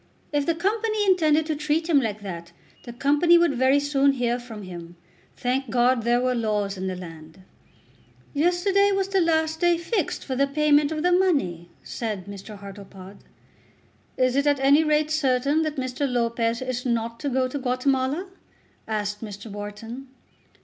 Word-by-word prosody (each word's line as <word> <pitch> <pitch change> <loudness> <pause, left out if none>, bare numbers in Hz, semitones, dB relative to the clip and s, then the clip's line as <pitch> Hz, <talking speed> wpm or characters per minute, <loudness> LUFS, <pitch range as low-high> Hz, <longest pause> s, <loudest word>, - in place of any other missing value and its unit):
If 290 -1 0
the 335 - +2
Company 430 +4 0
intended 315 -5 +3
to 310 -1 -2
treat 305 +2 -1
him 300 -5 +4
like 215 -3 -4
that, 170 -3 -7 0.3
the 240 - -7
Company 290 +7 +4
would 340 -4 +3
very 260 +2 +3
soon 280 -1 +2
hear 245 -2 -1
from 225 -4 -9
him. 175 -2 -9 0.4
Thank 255 +1 -1
God 245 +1 +2
there 240 +2 +2
were 255 0 +1
laws 210 -4 -1
in 190 0 -4
the 185 - -3
land. 165 0 -11 0.9
"Yesterday 360 +6 +2
was 390 0 0
the 390 -1 +2
last 320 -1 +1
day 345 -1 +3
fixed 345 +1 -2
for 260 - -3
the 275 +2 +2
payment 295 +1 +3
of 310 0 -3
the 360 - +3
money," 275 - +1
said 215 -5 -4
Mr. 200 +1 -9
Hartlepod. 195 -1 -11 1.0
"It 255 -1 +2
is 280 +1 +2
at 285 -1 +3
any 280 +3 +5
rate 305 0 +1
certain 280 0 +1
that 310 -1 -2
Mr. 260 +1 -2
Lopez 235 0 0
is 255 -1 -3
not 230 -2 -2
to 290 - -2
go 260 0 +1
to 280 +3 -5
Guatemala?" 265 +5 0 0.6
asked 210 -1 -3
Mr. 205 0 -8
Wharton. 210 +6 -7
260 Hz, 170 wpm, -24 LUFS, 220-310 Hz, 1.0 s, any